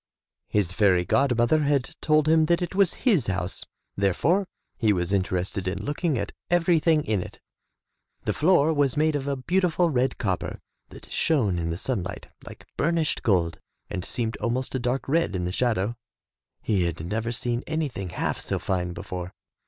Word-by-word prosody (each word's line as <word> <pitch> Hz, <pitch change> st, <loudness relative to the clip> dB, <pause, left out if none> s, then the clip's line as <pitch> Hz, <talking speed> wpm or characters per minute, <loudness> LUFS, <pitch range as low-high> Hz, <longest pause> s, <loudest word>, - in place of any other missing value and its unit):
His 100 Hz, -5 st, 0 dB
fairy 95 Hz, -4 st, +3 dB
god 135 Hz, +1 st, +2 dB
mother 120 Hz, +7 st, +3 dB
had 140 Hz, -3 st, +1 dB
told 155 Hz, -1 st, +3 dB
him 160 Hz, 0 st, +4 dB
that 175 Hz, +1 st, +2 dB
it 175 Hz, -, -4 dB
was 195 Hz, -2 st, +3 dB
his 195 Hz, -, +4 dB
house, 95 Hz, -1 st, -2 dB, 0.3 s
therefore 150 Hz, -, +2 dB, 0.3 s
he 110 Hz, -4 st, +2 dB
was 90 Hz, 0 st, 0 dB
interested 95 Hz, 0 st, -1 dB
in 90 Hz, -, -3 dB
looking 150 Hz, 0 st, 0 dB
at 100 Hz, -2 st, -3 dB, 0.2 s
everything 165 Hz, -3 st, +3 dB
in 105 Hz, -7 st, 0 dB
it. -, -, -9 dB, 0.8 s
The -, -, 0 dB
floor 160 Hz, -1 st, +4 dB
was 145 Hz, -3 st, +1 dB
made 155 Hz, 0 st, +2 dB
of 140 Hz, -1 st, -2 dB
a 140 Hz, -, 0 dB
beautiful 175 Hz, +4 st, +1 dB
red 130 Hz, -1 st, +1 dB
copper 95 Hz, -6 st, -2 dB, 0.3 s
that -, -, -13 dB
shone 110 Hz, -, +2 dB
in 85 Hz, 0 st, -2 dB
the 85 Hz, -, -2 dB
sunlight 110 Hz, -4 st, -3 dB
like -, -, -12 dB
burnished 165 Hz, -1 st, +1 dB
gold 85 Hz, -6 st, +1 dB, 0.3 s
and 90 Hz, -, -3 dB
seemed 115 Hz, +1 st, -2 dB
almost 120 Hz, +4 st, -2 dB
a 130 Hz, -, 0 dB
dark 125 Hz, +2 st, -1 dB
red 155 Hz, -, +1 dB
in 90 Hz, -1 st, -1 dB
the 90 Hz, -, -2 dB
shadow. 115 Hz, 0 st, 0 dB, 0.7 s
He 100 Hz, -5 st, +1 dB
had 85 Hz, -1 st, -3 dB
never 110 Hz, +5 st, -2 dB
seen 120 Hz, +1 st, -2 dB
anything 145 Hz, -, -2 dB
half -, -, -2 dB
so -, -, -2 dB
fine 90 Hz, -2 st, -2 dB
before. 90 Hz, 0 st, -6 dB
120 Hz, 175 wpm, -26 LUFS, 95-155 Hz, 0.8 s, him